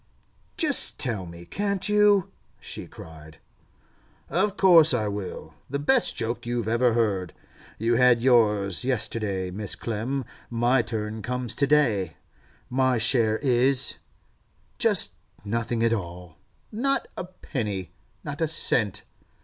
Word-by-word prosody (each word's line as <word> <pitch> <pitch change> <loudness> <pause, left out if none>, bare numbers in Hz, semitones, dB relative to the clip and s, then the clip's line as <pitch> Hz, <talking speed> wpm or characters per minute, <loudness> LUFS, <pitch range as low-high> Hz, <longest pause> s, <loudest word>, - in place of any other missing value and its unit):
'Just 305 -5 +4
tell 110 -9 -1
me, 85 +1 -11
can't 200 - -2
you?' 210 -3 +3 0.3
she - - -7
cried. 80 0 -13 0.9
'Of 195 +2 0
course 165 -7 +6
I 110 -3 -1
will. 100 -2 -6 0.2
The 140 - -2
best 220 - +2
joke 115 +1 -3
you 120 -2 -2
ever 120 +1 +2
heard. 100 -7 -1 0.4
You 115 +2 +1
had 125 -1 +5
yours 105 -6 +2
yesterday, 105 -7 0
Mrs. 100 +1 -2
Clem; 120 +4 -3 0.2
my 120 +2 +2
turn 110 -1 -4
comes 125 0 -2
to 140 - +1
day. 110 - +1 0.5
My 130 0 +1
share 115 -1 +2
is—just 130 0 0 0.3
nothing 115 +2 -2
at 115 0 +2
all. 90 -5 -6 0.4
Not 270 +4 -1
a - - -5
penny! 105 - -5 0.3
Not 145 +1 -6
a 160 - +2
cent! 110 - 0
115 Hz, 125 wpm, -25 LUFS, 105-140 Hz, 0.9 s, course